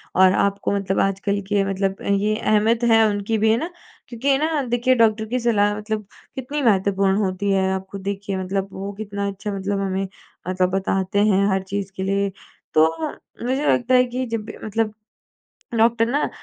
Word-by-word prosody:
और 185 0 +6
आपको 200 0 0
मतलब 195 -1 -1
आजकल 195 +1 0
के 205 -1 +2
मतलब 195 0 -1 0.2
ये 210 +1 +1
अहमियत 220 +2 +2
है 225 0 +6
उनकी 205 +2 -1
भी 220 +1 +3
है 225 - +3
ना? 325 +8 -3 0.4
क्योंकि 240 +3 -5
है 270 - +5
ना 310 0 0
देखिए 245 +2 +2
डॉक्टर 220 -2 +3
की 245 +3 -2
सलाह 205 -3 +2
मतलब 215 0 -4 0.3
कितनी 275 +3 -3
महत्वपूर्ण 195 -4 +2
होती 200 -1 0
है। 190 -1 +2
आप 190 0 -3
खुद 200 - -6
देखिए 200 0 -3
मतलब 190 +1 -2
वो 195 +1 -5
कितना 200 -1 -4
अच्छा 200 +1 -4
मतलब 195 +1 -2
हमें 195 0 -1 0.4
मतलब 185 0 +1
बताते 195 0 0
हैं 200 -2 +3
हर 190 0 0
चीज़ 195 0 -4
के 190 - -3
लिए, 200 +1 0 0.4
तो 155 +1 +6 0.6
मुझे 265 +4 0
लगता 250 +1 +1
है 250 - +6
कि 250 +1 -3
जब 230 -1 -2
भी 220 - -9
मतलब 215 0 -1 0.9
डॉक्टर 230 0 +4
ना 285 +3 +1
205 Hz, 185 wpm, -22 LUFS, 195-225 Hz, 0.9 s, और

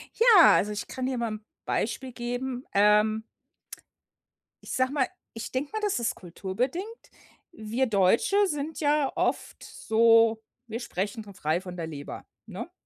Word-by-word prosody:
Ja, 450 -7 +7
also 210 - +1
ich 210 - -5
kann 255 - -4
dir 255 -1 -1
mal 235 -1 -1
‘n 215 0 -7 0.2
Beispiel 255 +4 -2
geben. 245 +1 -4
Ähm 210 +2 +4 1.4
ich - - -8
sage 260 0 +1
mal 275 -3 +1 0.3
ich 225 - -7
denke 275 +3 -2
mal, 435 - -2
das 415 - 0
ist 235 - -1
kulturbedingt. 250 - -5 0.4
Wir 230 0 -1
Deutsche 225 - +3
sind 300 -1 -4
ja 290 -1 +2
oft - - -2
so 225 0 +3 0.3
wir 230 +1 -5
sprechen 205 0 -4
von 200 - -13
frei 160 -1 -1
von 180 -1 -8
der 165 -2 -4
Leber, 145 -2 -8 0.2
ne? - - -8
230 Hz, 155 wpm, -27 LUFS, 210-265 Hz, 1.4 s, Ja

